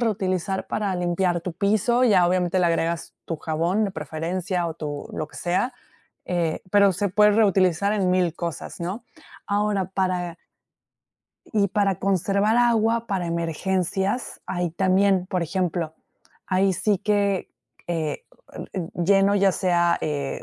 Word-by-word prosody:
reutilizar 190 -4 -1
para 200 -3 -1
limpiar 175 0 0
tu 175 +1 -5
piso 215 +6 +2
ya, 190 -7 +5
obviamente, 180 0 +1
le 175 - +3
agregas 165 0 -1
tu 165 - -4
jabón 165 +7 0
de 200 - -2
preferencia 170 +3 -3
o 160 - -6
tu 150 -3 -6
lo 155 - -3
que - - -14
sea, 185 +9 0 0.5
eh, 170 -3 -1
pero 200 -2 +5
se 200 +3 -1
puede 210 +3 +4
reutilizar 200 -2 +3
en 190 -4 +1
mil 180 -3 +1
cosas, 170 -1 -6
¿no?, 195 +8 -4 0.4
ahora 205 -2 0
para 185 -2 -2 1.1
y 205 -3 +2
para 195 -2 +1
conservar 200 +3 +1
agua 230 -1 +2
para 190 -4 -2
emergencias, 185 +6 -1
ahí 175 -2 -2
también, 190 +1 +2
por 180 -2 -1
ejemplo, 170 -2 -2 0.5
ahí 190 0 +2
sí 200 +2 +1
que, 200 -2 0 0.4
eh, 160 -4 -3 0.7
lleno, 195 +3 +3
ya 195 -1 +4
sea, 175 -2 +2
eh, 145 -3 -3
185 Hz, 140 wpm, -24 LUFS, 170-200 Hz, 1.1 s, ya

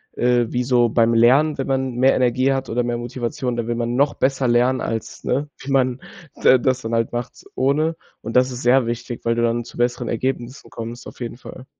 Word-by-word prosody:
Äh, 120 -1 +1
wie 125 0 0
so 120 -1 +3
beim 115 +1 +3
Lernen, 135 +7 +4
wenn 135 - -2
man 130 -2 -1
mehr 130 +2 +4
Energie 130 +2 +2
hat 135 0 -3
oder 120 +2 0
mehr 120 0 -2
Motivation, 120 0 -3
dann 120 -1 -2
will 120 - 0
man 120 0 -2
noch 140 +2 +2
besser 135 -1 0
lernen, 125 +2 +3
als, 115 -1 -5
ne? 145 +3 -1
Wie 135 - -6
man 130 -1 +2 0.4
da 130 - +5
das 130 0 0
dann 115 +1 -5
halt 115 0 0
macht 120 0 -5
ohne. 150 +5 +1 0.3
Und, 115 - -6
das 130 +1 +4
ist 125 0 -6
sehr 125 +1 +4
wichtig, 120 +1 -5
weil 115 - +1
du 120 - 0
dann 120 0 +1
zu 115 - -13
besseren 120 0 -1
Ergebnissen 125 +1 -3
kommst, 115 +1 -7
auf - - -12
jeden 120 -1 -6
Fall. 130 0 -11
125 Hz, 225 wpm, -21 LUFS, 120-130 Hz, 0.4 s, da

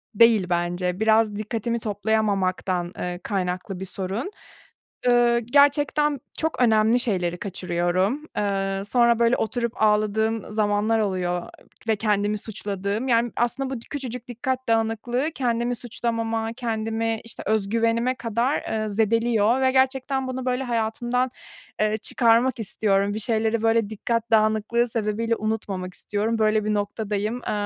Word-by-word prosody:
değil 220 -3 +5
bence 175 +1 -1
biraz 220 -1 +3
dikkatimi 230 +2 -2
toplayamamaktan, 200 -4 0
eee, 180 0 -3
kaynaklı 185 -1 -3
bir 190 - -5
sorun. 195 - -4 0.8
Iıı, 240 -1 +4
gerçekten 285 +3 +3 0.2
çok 320 -4 -1
önemli 220 +1 +4
şeyleri 180 -7 0
kaçırıyorum. 185 - -1
Eee, 195 -1 -1
sonra 235 +1 +3
böyle 235 +1 +4
oturup 235 +1 -2
ağladığım 215 +1 +1
zamanlar 210 +1 +1
oluyor 180 -4 -1 0.5
ve 220 - +4
kendimi 210 0 0
suçladığım, 205 +2 -3
yani, 235 -1 +2
aslında 260 +3 0
bu - - -5
küçücük 250 -3 -5
dikkat 255 +2 -3
dağınıklığı 225 +6 0
kendimi 240 -1 0
suçlamama, 230 -1 -2
kendimi, 225 -1 -2
işte, 230 - -8
özgüvenime 230 +4 +1
kadar, 235 +4 0
eee, 215 -1 -2
zedeliyor 225 +3 +2
ve 260 - +3
gerçekten 265 0 +1
bunu 255 0 -4
böyle 255 +1 0
hayatımdan, 240 +1 -1 0.5
eee, 215 0 +2
çıkarmak 235 +2 +2
istiyorum. 200 -1 +1
Bir 215 - -3
şeyleri, 220 0 0
böyle 225 -2 +2
dikkat 230 +2 -2
dağınıklığı 220 +2 +2
sebebiyle 225 0 -1
unutmamak 205 -4 -3
istiyorum. 215 +3 -2
Böyle 215 0 +3
bir 215 - +1
noktadayım. 210 +2 -2
Eee, - - 0
225 Hz, 130 wpm, -24 LUFS, 205-240 Hz, 0.8 s, değil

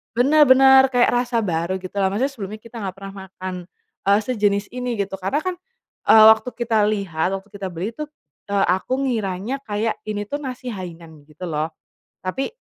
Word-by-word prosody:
Bener 290 +6 +5
bener 265 0 +8
kayak 245 0 +4
rasa 245 -1 0
baru 170 0 -1
gitu 185 - -8
loh 190 - +3
maksudnya 260 +7 0
sebelumnya 215 -3 -7
kita 230 0 -14
gak 190 - -6
pernah 195 0 -8
makan, 185 0 -6 0.5
eee, 200 +1 +5
sejenis 205 -4 0
ini 250 0 -3
gitu 195 -1 -3
karena 195 +10 0
kan, 370 -1 -2 0.5
eee, 220 -1 +8
waktu 220 +3 +1
kita 235 -2 0
lihat 195 -7 -1
waktu 195 +2 -9
kita 200 -2 -5
beli 185 +7 -3
tuh, 300 -1 -4 0.4
eee, 200 -1 +2
aku 190 +7 -4
ngiranya 225 0 -2
kayak 215 +1 -1
ini 205 -1 -2
tuh 285 - -2
nasi 255 -2 -6
hainan 170 -4 -8 0.2
gitu 155 +4 -13
loh, 155 +1 -1 0.6
tapi, 265 - -2
210 Hz, 180 wpm, -22 LUFS, 190-250 Hz, 0.6 s, bener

